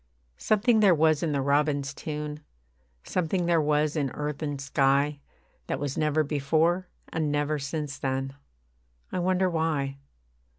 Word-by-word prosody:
Something 220 +2 +3
there 195 -5 +6
was 155 -1 +3
in 165 - 0
the 140 -2 0
robin's 140 0 +1
tune, 150 0 -5 0.6
Something 180 0 -1
there 170 -2 +3
was 150 0 +1
in 145 -3 0
earth 150 0 -4
and 145 -2 -3
sky, 140 +2 +2 0.5
That - - -2
was 145 -2 -3
never 155 0 +2
before, 160 +5 +1 0.2
and 155 -2 -1
never 145 +1 0
since 145 -1 -4
then. 135 0 -2 0.8
I 185 - -1
wonder 185 +1 +2
why. 155 -5 -1
150 Hz, 140 wpm, -27 LUFS, 140-165 Hz, 0.8 s, there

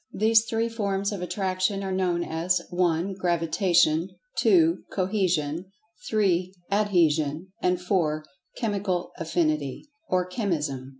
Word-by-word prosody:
These 220 +1 +4
three 225 0 0
forms 200 -3 -1
of 200 -3 -4
Attraction 190 +1 -1
are 190 - -3
known 180 -2 0
as 170 +2 0
(1) 175 +1 +1
Gravitation; 170 -1 +2 0.3
(2) 335 -3 +4
Cohesion; 185 -3 -1 0.4
(3) 185 -4 +1 0.2
Adhesion; 170 -5 +1
and 180 0 +1
(4) 165 -5 0 0.3
Chemical 200 -5 -1
Affinity, 155 - -1 0.2
or 180 -1 +2
Chemism. 155 - -2
180 Hz, 110 wpm, -26 LUFS, 165-200 Hz, 0.4 s, These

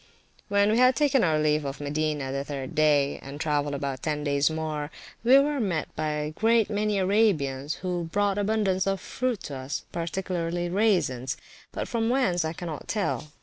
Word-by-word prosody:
[p.388] - - -31
When 200 +1 +3
we 220 - +2
had 255 0 +6
taken 285 -3 +3
our 160 -3 +3
leave 150 0 +2
of 140 0 -5
Medina, 150 -1 -1
the 140 0 -2
third 135 -2 -5
day, 145 -2 +3
and 140 +2 -8
travelled 145 -2 0
about 135 -2 -3
ten 150 -2 -2
days 140 0 +2
more, 155 -2 -3 0.3
we 250 +3 +7
were 285 +1 +2
met 180 -9 -2
by 155 - -1
a 150 0 -2
great 225 +4 +2
many 210 0 0
Arabians, 165 -9 +1
who 175 -2 -1
brought 200 +4 0
abundance 200 -3 +1
of 195 0 0
fruit 250 +2 -2
to 140 - -6
us, 130 +2 -5
particularly 175 0 -2
raisins; 170 - +1 0.3
but - - -4
from 230 -1 0
whence 195 -10 +2
I 160 - -1
cannot 165 -3 -6
tell. 200 -7 -1
165 Hz, 185 wpm, -27 LUFS, 145-205 Hz, 0.3 s, we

